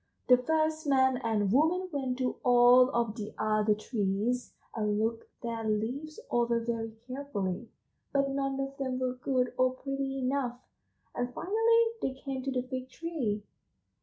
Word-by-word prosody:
"The 250 Hz, -, +9 dB
first 315 Hz, +3 st, 0 dB
man 260 Hz, -2 st, +4 dB
and 215 Hz, -4 st, 0 dB
woman 325 Hz, -, +3 dB
went 265 Hz, -4 st, -2 dB
to 255 Hz, -1 st, -1 dB
all 245 Hz, +1 st, +7 dB
of 235 Hz, -4 st, 0 dB
the 210 Hz, -2 st, -6 dB
other 215 Hz, 0 st, +2 dB
trees 215 Hz, +3 st, -1 dB, 0.2 s
and 210 Hz, -2 st, 0 dB
looked 225 Hz, +1 st, -1 dB
their 230 Hz, -1 st, -3 dB
leaves 245 Hz, -, -2 dB
over 235 Hz, -1 st, +2 dB
very 230 Hz, -1 st, -3 dB
carefully, 235 Hz, -6 st, -3 dB, 0.4 s
but 275 Hz, -1 st, +1 dB
none 275 Hz, 0 st, -1 dB
of 275 Hz, 0 st, -3 dB
them 260 Hz, -2 st, -2 dB
were 255 Hz, -1 st, -1 dB
good 255 Hz, 0 st, 0 dB
or 255 Hz, 0 st, +4 dB
pretty 275 Hz, 0 st, -3 dB
enough, 255 Hz, -2 st, -1 dB, 0.5 s
and 245 Hz, 0 st, -2 dB
finally 450 Hz, +4 st, +3 dB, 0.2 s
they 265 Hz, -, -1 dB
came 270 Hz, -1 st, -5 dB
to 270 Hz, +1 st, -2 dB
the 250 Hz, -1 st, 0 dB
Fig 255 Hz, 0 st, -5 dB
tree." 260 Hz, -11 st, -3 dB
255 Hz, 155 wpm, -30 LUFS, 230-275 Hz, 0.5 s, The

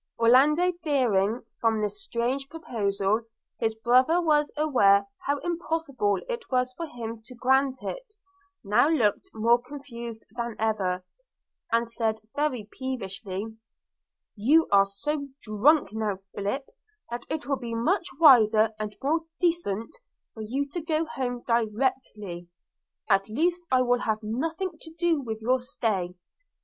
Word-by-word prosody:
Orlando, 285 Hz, +10 st, +5 dB
fearing, 240 Hz, -, +1 dB, 0.2 s
from 225 Hz, -1 st, +2 dB
this 210 Hz, 0 st, -2 dB
strange 255 Hz, +4 st, -2 dB
proposal, 210 Hz, -9 st, -1 dB, 0.4 s
his 225 Hz, -1 st, 0 dB
brother 255 Hz, +9 st, +4 dB
was 300 Hz, -3 st, +2 dB
aware 205 Hz, -10 st, +4 dB, 0.2 s
how 285 Hz, +1 st, +2 dB
impossible 325 Hz, -, -1 dB
it 475 Hz, -1 st, -5 dB
was 255 Hz, -1 st, +1 dB
for 335 Hz, +5 st, -5 dB
him 230 Hz, -4 st, -7 dB
to 250 Hz, -, -10 dB
grant 265 Hz, +2 st, +2 dB
it, -, -, -6 dB, 0.5 s
now 215 Hz, +6 st, +4 dB
looked 230 Hz, -11 st, +1 dB
more 235 Hz, +2 st, +3 dB
confused 240 Hz, -4 st, -8 dB
than 235 Hz, -1 st, -4 dB
ever, 190 Hz, -5 st, -1 dB, 0.7 s
and 230 Hz, 0 st, +1 dB
said 225 Hz, -2 st, 0 dB, 0.2 s
very 265 Hz, -8 st, -1 dB
peevishly, 220 Hz, -4 st, -5 dB, 0.8 s
'You 285 Hz, +10 st, +4 dB
are 200 Hz, -1 st, +6 dB
so 280 Hz, +9 st, -3 dB, 0.2 s
drunk 235 Hz, +9 st, +3 dB
now, 215 Hz, -3 st, -1 dB, 0.2 s
Philip, 205 Hz, +8 st, -2 dB, 0.5 s
that 240 Hz, 0 st, -4 dB
it 310 Hz, -, -3 dB
will 275 Hz, -1 st, 0 dB
be 235 Hz, -2 st, -4 dB
much 340 Hz, -, +1 dB
wiser 225 Hz, -8 st, +7 dB
and 210 Hz, -1 st, -4 dB
more 315 Hz, +4 st, +2 dB, 0.2 s
decent 330 Hz, -, 0 dB, 0.4 s
for 220 Hz, -, -8 dB
you 265 Hz, +6 st, -2 dB
to 345 Hz, +4 st, -4 dB
go 320 Hz, 0 st, 0 dB
home 245 Hz, -5 st, -4 dB
directly 220 Hz, -6 st, -1 dB, 0.3 s
– -, -, -61 dB
I -, -, +4 dB
at 195 Hz, +2 st, -15 dB
least 340 Hz, +10 st, +1 dB
will 250 Hz, -1 st, +3 dB
have 220 Hz, -2 st, -1 dB
nothing 320 Hz, -, -3 dB
to 320 Hz, -, -9 dB
do 335 Hz, -3 st, +2 dB
with 220 Hz, -3 st, -5 dB
your 255 Hz, +3 st, +3 dB
stay. 210 Hz, -8 st, -2 dB
240 Hz, 140 wpm, -27 LUFS, 215-290 Hz, 0.8 s, wiser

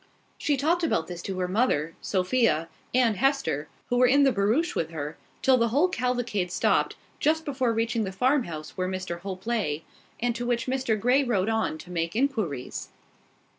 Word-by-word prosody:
She 290 Hz, -2 st, +1 dB
talked 335 Hz, +6 st, +1 dB
about 165 Hz, -, +1 dB
this 175 Hz, 0 st, -7 dB
to 190 Hz, 0 st, -4 dB
her 180 Hz, -1 st, 0 dB
mother, 180 Hz, -, +1 dB
Sophia, 185 Hz, -4 st, +1 dB, 0.2 s
and 240 Hz, -5 st, +3 dB
Hester, 270 Hz, -, +1 dB, 0.2 s
who 245 Hz, -, +1 dB
were 250 Hz, 0 st, +6 dB
in 280 Hz, +3 st, +5 dB
the 270 Hz, -, +5 dB
barouche 225 Hz, -, +1 dB
with 160 Hz, -, -1 dB
her, 155 Hz, -1 st, -5 dB, 0.3 s
till 260 Hz, -1 st, +5 dB
the 235 Hz, -1 st, +3 dB
whole 285 Hz, +10 st, +3 dB
cavalcade 245 Hz, -, -1 dB
stopped, -, -, +2 dB, 0.2 s
just 320 Hz, +1 st, +2 dB
before 260 Hz, -5 st, 0 dB
reaching 230 Hz, 0 st, 0 dB
the 190 Hz, -, -3 dB
farmhouse 190 Hz, -, 0 dB
where 185 Hz, 0 st, -2 dB
Mr 185 Hz, -2 st, -4 dB
Hope 190 Hz, 0 st, -7 dB
lay, 195 Hz, -10 st, -1 dB, 0.4 s
and 240 Hz, 0 st, 0 dB
to 240 Hz, -, -3 dB
which 240 Hz, 0 st, 0 dB
Mr 255 Hz, -4 st, 0 dB
Grey 250 Hz, +6 st, +3 dB
rode 215 Hz, -5 st, +1 dB
on 220 Hz, -8 st, 0 dB
to 180 Hz, -, -11 dB
make 165 Hz, +1 st, -2 dB
inquiries. 220 Hz, -, -1 dB
225 Hz, 180 wpm, -27 LUFS, 180-255 Hz, 0.4 s, were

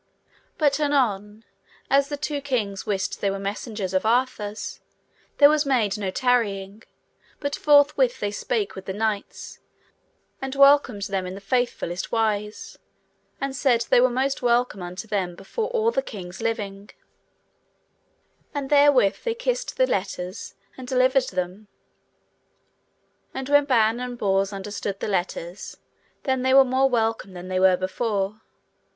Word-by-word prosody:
But 290 Hz, -2 st, +2 dB
anon, 225 Hz, -8 st, 0 dB, 0.4 s
as 275 Hz, 0 st, +3 dB
the 290 Hz, -, -3 dB
two 295 Hz, -1 st, -3 dB
kings 220 Hz, -8 st, -2 dB
wist 195 Hz, -3 st, -2 dB
they 200 Hz, -, +1 dB
were 195 Hz, -, -2 dB
messengers 200 Hz, 0 st, -4 dB
of 185 Hz, -, +1 dB
Arthur's, 225 Hz, -2 st, -1 dB, 0.6 s
there 285 Hz, -, +8 dB
was 300 Hz, 0 st, +3 dB
made 240 Hz, -8 st, +1 dB
no 200 Hz, -2 st, -3 dB
tarrying, 205 Hz, -3 st, 0 dB, 0.6 s
but 285 Hz, -1 st, -2 dB
forthwith 285 Hz, -4 st, +4 dB
they 205 Hz, -, -2 dB
spake 210 Hz, 0 st, -2 dB
with 190 Hz, -, -9 dB
the 190 Hz, -, -4 dB
knights, 215 Hz, -2 st, -3 dB, 0.8 s
and 270 Hz, 0 st, -4 dB
welcomed 275 Hz, -6 st, +5 dB
them 195 Hz, -2 st, -2 dB
in 185 Hz, -, -6 dB
the -, -, -8 dB
faithfullest 205 Hz, -5 st, -2 dB
wise, 210 Hz, -2 st, -2 dB, 0.6 s
and 275 Hz, -1 st, -3 dB
said 245 Hz, -4 st, +2 dB
they 245 Hz, -, +6 dB
were 255 Hz, -, +5 dB
most 265 Hz, +2 st, -1 dB
welcome 240 Hz, -4 st, +1 dB
unto 180 Hz, +4 st, -7 dB
them 190 Hz, -4 st, -2 dB
before 315 Hz, -, -4 dB
all 460 Hz, -2 st, +1 dB
the 270 Hz, -, 0 dB
kings 190 Hz, -7 st, -9 dB
living; 205 Hz, -3 st, -3 dB, 1.7 s
and 280 Hz, -1 st, -4 dB
therewith 285 Hz, -8 st, +5 dB
they 465 Hz, -2 st, -1 dB
kissed -, -, -2 dB
the -, -, +4 dB
letters 185 Hz, -, -4 dB, 0.2 s
and 255 Hz, -1 st, -9 dB
delivered 255 Hz, +1 st, +3 dB
them. 185 Hz, +3 st, -4 dB, 1.7 s
And 265 Hz, 0 st, -4 dB
when 290 Hz, 0 st, +5 dB
Ban 230 Hz, -4 st, +3 dB
and 250 Hz, -1 st, -5 dB
Bors 195 Hz, -2 st, +1 dB
understood 200 Hz, 0 st, -5 dB
the -, -, -3 dB
letters, 180 Hz, -2 st, -3 dB, 0.5 s
then 260 Hz, -2 st, 0 dB
they 260 Hz, +1 st, +3 dB
were 270 Hz, 0 st, +8 dB
more 260 Hz, +1 st, +2 dB
welcome 225 Hz, -5 st, -1 dB
than 180 Hz, 0 st, -8 dB
they 185 Hz, 0 st, 0 dB
were 185 Hz, -1 st, +5 dB
before. 200 Hz, +2 st, -2 dB
225 Hz, 145 wpm, -24 LUFS, 195-270 Hz, 1.7 s, there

